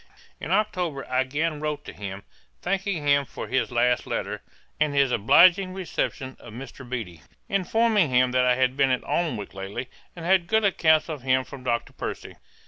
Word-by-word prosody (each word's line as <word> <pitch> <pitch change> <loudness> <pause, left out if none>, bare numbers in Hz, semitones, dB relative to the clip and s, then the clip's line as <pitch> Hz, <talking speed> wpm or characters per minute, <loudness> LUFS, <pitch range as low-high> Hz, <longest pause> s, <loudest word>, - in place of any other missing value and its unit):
In - - -6
October 180 -7 0
I 130 0 0
again 150 +4 -1
wrote 150 -1 -3
to - - -8
him, 100 -1 -7 0.4
thanking 190 -4 -1
him 140 0 +4
for 130 - -8
his 130 +1 0
last 120 +1 +1
letter, - - -3 0.4
and 150 -2 +1
his 140 -2 +3
obliging 185 - +5
reception 135 -7 -3
of 115 - -12
Mr. 130 +1 -9
Beattie; 100 -11 -5 0.3
informing 205 -1 +2
him 125 0 +3
that 125 0 +3
I 125 0 +4
had 130 0 +1
been 135 -1 +3
at 130 -1 0
Alnwick 155 -12 -2
lately, 100 +6 -6 0.3
and 170 -2 -8
had 180 -1 +3
good 220 +2 +2
accounts 160 -5 +3
of 155 -5 -5
him 130 0 +2
from 130 0 -11
Dr. 120 -2 -2
Percy. - - -6
140 Hz, 180 wpm, -25 LUFS, 125-175 Hz, 0.4 s, obliging